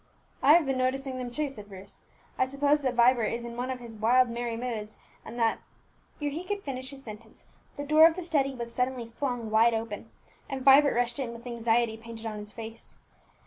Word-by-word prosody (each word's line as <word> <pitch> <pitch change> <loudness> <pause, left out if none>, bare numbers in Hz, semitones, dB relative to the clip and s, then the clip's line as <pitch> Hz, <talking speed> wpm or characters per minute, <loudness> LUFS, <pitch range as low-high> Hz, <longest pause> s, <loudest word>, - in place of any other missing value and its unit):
"I 285 - +7
have 335 -1 +5
been 270 -1 -1
noticing 260 0 -1
them 250 -1 -4
too," 295 +5 -1
said 210 -7 -9
Bruce. 195 0 -8 0.3
"I - - +2
suppose 285 +2 +2
that 260 -2 -1
Vibert 240 -1 +4
is 235 +1 -4
in 235 0 -7
one 250 +2 -3
of 260 -1 -3
his 235 -2 -9
wild 240 +3 +4
merry 235 -1 -3
moods, 225 -3 -4 0.3
and 240 - -9
that 230 -2 +2 0.3
" - - -36
Ere 290 - 0
he 320 +5 -4
could 405 +1 -4
finish 260 -2 -5
his 275 -1 -10
sentence, 220 -1 -12 0.3
the 285 - -4
door 310 +2 +8
of 325 - -1
the 365 - -5
study 275 -5 +1
was 235 -1 -6
suddenly 250 -1 -1
flung 235 -1 -4
wide 225 +1 +5
open, 225 0 -5 0.4
and 270 -1 -4
Vibert 280 0 +7
rushed 240 +1 +1
in, 245 -3 -3
with 235 +1 -11
anxiety 235 -1 +1
painted 230 0 -10
on 215 -1 -4
his 210 0 -7
face. 225 0 -9
245 Hz, 220 wpm, -28 LUFS, 230-270 Hz, 0.4 s, door